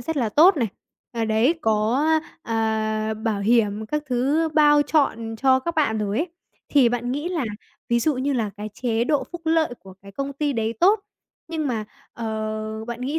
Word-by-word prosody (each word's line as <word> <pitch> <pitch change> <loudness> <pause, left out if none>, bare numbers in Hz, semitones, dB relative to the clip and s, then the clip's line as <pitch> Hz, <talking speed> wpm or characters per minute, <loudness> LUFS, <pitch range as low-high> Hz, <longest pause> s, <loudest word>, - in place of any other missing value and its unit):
rất 320 +6 -4
là 240 -5 +1
tốt 325 - +6
này. 235 -6 0 0.4
À, 230 -1 -1
đấy, 220 +8 +2
có, 220 +5 +1 0.4
a, 220 -1 -1
à, - - -3
bảo 215 -1 -2
hiểm 215 -1 +2
các 300 +5 -2
thứ 275 +6 +1
bao 295 -1 +6
trọn 230 -8 0
cho 260 +1 +3
các 335 +4 -3
bạn 255 -9 +1
rồi 210 +1 -1
ấy, 320 - 0 0.4
thì 275 -5 +5
bạn 245 +1 -2
nghĩ 295 +5 -2
là, 340 -7 -1 0.4
ví 235 0 +2
dụ 305 +4 +1
như 270 +3 0
là 225 -5 -1
cái 210 +1 -5
chế 235 -2 0
độ 295 +2 +1
phúc 345 - -6
lợi 320 -5 +2
của 190 -1 -13
cái 200 0 -12
công 275 +3 -4
ty 290 +1 -1
đấy 225 -2 -1
tốt, 400 +4 +5 0.5
nhưng 315 -3 -2
mà, 225 -5 -2 0.3
ờ, 220 -1 -4
bạn 240 0 -5
nghĩ 280 +5 -1
240 Hz, 200 wpm, -23 LUFS, 220-295 Hz, 0.5 s, tốt